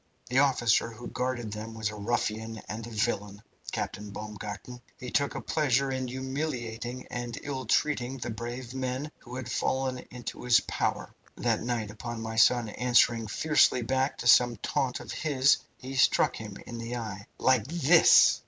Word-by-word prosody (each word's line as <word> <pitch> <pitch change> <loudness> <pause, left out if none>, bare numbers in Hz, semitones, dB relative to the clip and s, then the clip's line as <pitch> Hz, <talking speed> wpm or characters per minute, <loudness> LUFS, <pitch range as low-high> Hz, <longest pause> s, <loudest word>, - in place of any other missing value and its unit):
The 125 +2 +3
officer 120 -5 +3
who 115 +1 -10
guarded 125 -4 -2
them 110 +1 -6
was 110 -1 -1
a - - -8
ruffian 110 +1 -2
and 110 +2 -5
a - - -8
villain, 105 -2 -2 0.3
Captain 105 +1 -4
Baumgarten. 105 +3 -7 0.2
He 125 -2 -7
took 140 -1 +1
a - - -3
pleasure 135 -3 +1
in 130 -1 -2
humiliating 130 -2 -4
and 120 -1 -4
ill 135 -2 -4
treating 135 -3 +1
the 120 -2 -4
brave 120 +2 -6
men 130 +3 -3
who 120 0 -10
had 130 -1 -5
fallen 130 -1 0
into 125 -1 -7
his 120 -1 +6
power. - - -2 0.2
That - - 0
night 115 -3 -2
upon 120 +2 -6
my 110 0 -5
son 120 0 +5
answering 120 -1 +3
fiercely 140 +1 +3
back 130 +3 0
to 120 - -3
some 120 -1 +6
taunt 125 +4 -1
of - - -8
his, 140 -3 +3 0.2
he 130 +1 -8
struck 130 +1 +4
him 105 -3 -7
in 120 -1 -7
the 115 +1 -4
eye, 105 -4 -6
like 130 -4 +3
this!" 165 +1 +6
120 Hz, 170 wpm, -29 LUFS, 110-130 Hz, 0.3 s, his